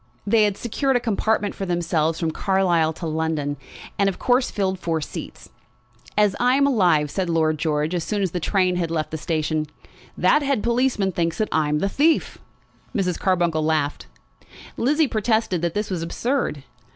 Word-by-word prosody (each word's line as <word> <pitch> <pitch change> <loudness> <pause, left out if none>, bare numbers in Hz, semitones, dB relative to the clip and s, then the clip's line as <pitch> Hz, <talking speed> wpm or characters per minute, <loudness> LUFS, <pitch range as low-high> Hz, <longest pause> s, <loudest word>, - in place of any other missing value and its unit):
They 215 +1 +4
had 205 -2 -1
secured 265 +3 -1
a - - +4
compartment 220 -2 0
for 195 - -5
themselves 165 -2 0
from 165 -1 0
Carlisle 175 -4 +1
to 165 - -7
London, 155 -2 -1 0.4
and 200 0 +4
of 185 - -5
course 250 0 +2
filled 190 -2 -1
four 165 -2 -1
seats. 150 - -8 0.7
"As 210 -2 +3
I 250 +1 +3
am 280 0 +4
alive," 175 - +3
said 185 -3 -2
Lord 160 -2 +1
George 155 +1 0
as 175 -2 -1
soon 205 +1 -1
as 185 - -1
the 180 - -2
train 185 +1 +1
had 170 -2 -1
left 160 -2 -2
the 160 - -3
station, 155 -1 -1 0.5
"that 300 - +4
head 275 -6 0
policeman 235 -5 +1
thinks 170 -2 -1
that 215 - -1
I 155 -2 +1
am 150 - +1
the 195 - 0
thief!" 305 +10 +1 0.6
Mrs. 180 -5 0
Carbuncle 175 -4 +1
laughed. 155 -2 -1 0.7
Lizzie 295 +5 +2
protested 220 -5 0
that 170 -1 -2
this 210 -1 -2
was 180 -3 -2
absurd. 170 - -2
180 Hz, 180 wpm, -23 LUFS, 160-215 Hz, 0.7 s, They